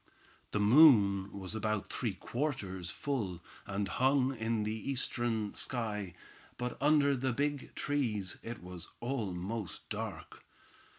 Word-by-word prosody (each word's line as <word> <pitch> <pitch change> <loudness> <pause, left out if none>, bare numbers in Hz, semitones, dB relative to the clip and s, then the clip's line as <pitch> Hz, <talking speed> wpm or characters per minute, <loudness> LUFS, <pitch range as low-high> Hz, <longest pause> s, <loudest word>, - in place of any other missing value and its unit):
The 105 - -1
moon 105 -5 +7
was 95 0 -5
about 110 -1 -1
three 115 -6 -1
quarters 100 - -3
full, 105 -6 -2 0.3
and 100 0 -1
hung 130 +5 +2
in 115 -1 0
the 105 +1 -1
eastern 115 -3 -1
sky; 105 -7 -3 0.4
but 125 0 -3
under 145 -1 +5
the 130 0 0
big 145 +2 -2
trees 115 -10 -1
it 115 -4 -7
was 90 -1 -8
almost 110 -5 -3
dark. - - -6
110 Hz, 120 wpm, -33 LUFS, 100-130 Hz, 0.4 s, moon